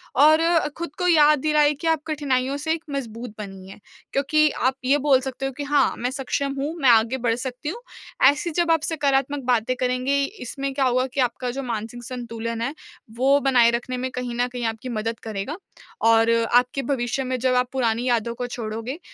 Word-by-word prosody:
और 310 Hz, +3 st, +6 dB
अ, 330 Hz, -1 st, +2 dB
खुद 340 Hz, -3 st, -6 dB
को 360 Hz, -, +1 dB
याद 305 Hz, -3 st, +5 dB
दिलाएँ 300 Hz, 0 st, +3 dB
कि 335 Hz, -, -2 dB
आप 320 Hz, -2 st, +2 dB
कठिनाइयों 280 Hz, -3 st, -1 dB
से 320 Hz, +2 st, -1 dB
एक 325 Hz, 0 st, -5 dB
मज़बूत 235 Hz, -4 st, -5 dB
बनी 195 Hz, -2 st, -8 dB
है 195 Hz, -, -12 dB, 0.3 s
क्योंकि 305 Hz, +3 st, +3 dB
आप 260 Hz, +2 st, 0 dB
ये 275 Hz, +3 st, +4 dB
बोल 280 Hz, -2 st, +3 dB
सकते 265 Hz, 0 st, -4 dB
हो 270 Hz, -, -2 dB
कि 290 Hz, -, -3 dB
हाँ 285 Hz, -1 st, +2 dB
मैं 245 Hz, +2 st, -2 dB
सक्षम 275 Hz, 0 st, -2 dB
हूँ, 290 Hz, +3 st, -2 dB
मैं 265 Hz, -, +5 dB
आगे 230 Hz, +2 st, +4 dB
बढ़ 235 Hz, -2 st, 0 dB
सकती 255 Hz, +3 st, -5 dB
हूँ। 450 Hz, +9 st, -6 dB, 0.5 s
ऐसी 295 Hz, +4 st, -1 dB
जब 340 Hz, -1 st, +2 dB
आप 325 Hz, -2 st, +3 dB
सकारात्मक 280 Hz, -3 st, 0 dB
बातें 245 Hz, 0 st, +1 dB
करेंगे, 255 Hz, +2 st, +1 dB
इसमें 275 Hz, -, -5 dB
क्या 270 Hz, 0 st, +1 dB
होगा 255 Hz, 0 st, +2 dB
कि 280 Hz, -, -3 dB
आपका 250 Hz, 0 st, -1 dB
जो 275 Hz, +2 st, -5 dB
मानसिक 235 Hz, 0 st, -5 dB
संतुलन 230 Hz, -2 st, -5 dB
है 260 Hz, +5 st, -2 dB, 0.4 s
वो 275 Hz, +3 st, +4 dB
बनाए 245 Hz, -4 st, +4 dB
रखने 245 Hz, +2 st, -3 dB
में 255 Hz, +1 st, -3 dB
कहीं 250 Hz, -1 st, -4 dB
न 245 Hz, -, +2 dB
कहीं 245 Hz, -1 st, -3 dB
आपकी 225 Hz, +2 st, -4 dB
मदद 225 Hz, 0 st, -3 dB
करेगा 220 Hz, -, -4 dB, 0.5 s
और 225 Hz, 0 st, +4 dB, 0.3 s
आपके 250 Hz, +2 st, +3 dB
भविष्य 245 Hz, +1 st, -2 dB
में 255 Hz, 0 st, -2 dB
जब 255 Hz, +1 st, +1 dB
आप 250 Hz, 0 st, +1 dB
पुरानी 240 Hz, -1 st, 0 dB
यादों 235 Hz, -1 st, 0 dB
को 245 Hz, +1 st, -4 dB
छोड़ोगे, 230 Hz, +4 st, -5 dB
255 Hz, 205 wpm, -23 LUFS, 240-285 Hz, 0.5 s, और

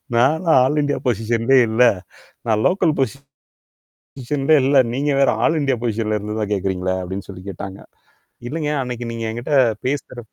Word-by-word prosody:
நான்லாம் 155 Hz, +5 st, +3 dB
all 150 Hz, +3 st, +1 dB
India 145 Hz, 0 st, -1 dB
பொசிஷன்லே 115 Hz, +3 st, +2 dB
இல்ல. 110 Hz, +3 st, +3 dB, 0.6 s
நான் 110 Hz, -1 st, +2 dB
லோக்கல் 180 Hz, -4 st, +1 dB, 1.0 s
பொசிஷன்லே 140 Hz, +3 st, -1 dB
இல்ல -, -, +1 dB
இல்ல. 140 Hz, 0 st, +4 dB
நீங்க 145 Hz, +3 st, 0 dB
வேற 135 Hz, -, +4 dB, 0.2 s
ஆல் 160 Hz, -, +2 dB
இண்டியா 135 Hz, -2 st, +1 dB
பொசிஷன்ல 110 Hz, -2 st, -1 dB
இருந்து 105 Hz, +2 st, -5 dB
தான் 105 Hz, -1 st, -3 dB
கேட்கிறீங்களா, 95 Hz, -1 st, -1 dB
அப்படின்னு 95 Hz, +2 st, -6 dB
சொல்லி 90 Hz, -1 st, -9 dB
கேட்டாங்க. 95 Hz, +1 st, -7 dB, 0.7 s
இல்லைங்க 150 Hz, 0 st, -2 dB
அன்னைக்கு 125 Hz, -1 st, -5 dB
நீங்க 115 Hz, 0 st, -5 dB
எங்கிட்ட 120 Hz, +6 st, -3 dB, 0.3 s
பேசற 130 Hz, -2 st, -3 dB
120 Hz, 150 wpm, -20 LUFS, 105-145 Hz, 1.0 s, இல்ல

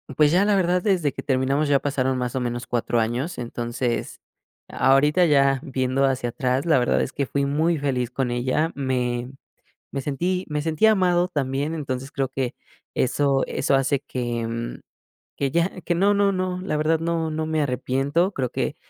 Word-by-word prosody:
pues 150 Hz, +1 st, +4 dB
ya, 185 Hz, +4 st, +4 dB
la 205 Hz, -1 st, +3 dB
verdad, 180 Hz, -1 st, +2 dB
desde 175 Hz, -9 st, +2 dB
que -, -, -8 dB
terminamos 135 Hz, +2 st, +1 dB
ya 140 Hz, -, +4 dB
pasaron 130 Hz, -2 st, -1 dB
más 125 Hz, 0 st, -3 dB
o -, -, +1 dB
menos 120 Hz, -1 st, -3 dB
4, 120 Hz, -1 st, 0 dB
años. 125 Hz, +9 st, -2 dB
Entonces, 120 Hz, 0 st, -3 dB, 0.5 s
ahorita 150 Hz, +6 st, +3 dB
ya, 140 Hz, -3 st, +3 dB
viendo 130 Hz, 0 st, 0 dB
hacia 130 Hz, -2 st, 0 dB
atrás, 130 Hz, +5 st, -1 dB
la 160 Hz, -, +5 dB
verdad 125 Hz, -1 st, +2 dB
es 130 Hz, -, -2 dB
que 140 Hz, -, -2 dB
fui 140 Hz, +2 st, -1 dB
muy 155 Hz, +3 st, +1 dB
feliz 130 Hz, -4 st, -1 dB
con 130 Hz, -1 st, -1 dB
ella. 130 Hz, +7 st, 0 dB
Me 125 Hz, -2 st, -1 dB, 0.6 s
me 135 Hz, -, -3 dB
sentí 175 Hz, +7 st, -1 dB
me 150 Hz, 0 st, -2 dB
sentí 160 Hz, +7 st, +3 dB
amado 180 Hz, -4 st, +3 dB
también, 145 Hz, -1 st, -2 dB
entonces 135 Hz, -3 st, -4 dB
creo 135 Hz, -1 st, -1 dB
que, 130 Hz, -2 st, -3 dB, 0.4 s
eso 135 Hz, +1 st, +2 dB
eso 140 Hz, -, 0 dB
hace 135 Hz, 0 st, +1 dB
que, 120 Hz, -4 st, -3 dB
mm, 115 Hz, +1 st, -5 dB, 0.6 s
que 140 Hz, -1 st, 0 dB
ya 170 Hz, +4 st, 0 dB
que 175 Hz, -, -1 dB
no 200 Hz, +3 st, +3 dB
no 200 Hz, -1 st, +3 dB
no, 185 Hz, -1 st, -2 dB
la 170 Hz, -5 st, -2 dB
verdad 155 Hz, +1 st, +2 dB
no 165 Hz, -1 st, -1 dB
no 155 Hz, 0 st, -2 dB
me 155 Hz, -1 st, +1 dB
arrepiento, 140 Hz, +7 st, 0 dB
creo 125 Hz, -3 st, -2 dB
que -, -, -2 dB
140 Hz, 185 wpm, -23 LUFS, 130-165 Hz, 0.6 s, la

